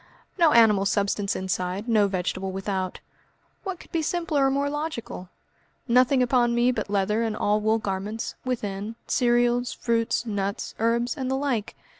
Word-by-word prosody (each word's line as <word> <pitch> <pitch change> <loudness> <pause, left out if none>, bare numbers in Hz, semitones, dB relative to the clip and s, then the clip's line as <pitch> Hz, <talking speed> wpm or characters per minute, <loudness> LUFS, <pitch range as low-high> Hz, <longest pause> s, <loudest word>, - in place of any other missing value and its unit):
No 335 -4 +4
animal 215 -5 +5
substance 200 0 0
inside, 185 +2 -2
no 215 -3 +4
vegetable 190 0 -2
without; 190 -1 -3 0.6
what 380 -3 -4
could - - -15
be 330 - 0
simpler 310 -4 +1
or - - +3
more 280 +1 0
logical? 290 - -5 0.6
Nothing 255 +2 +4
upon 240 -1 +2
me 240 +1 +3
but 245 - -3
leather 205 +2 +1
and 225 -2 -1
allwool 215 +1 +2
garments, 205 +1 -4
within, 215 -4 -3
cereals, 240 0 +2
fruit, 230 -1 0
nuts, 200 -2 -3
herbs, 235 +3 +1
and 260 -4 -3
the 265 - +1
like. 260 -7 -2
230 Hz, 150 wpm, -25 LUFS, 200-255 Hz, 0.6 s, animal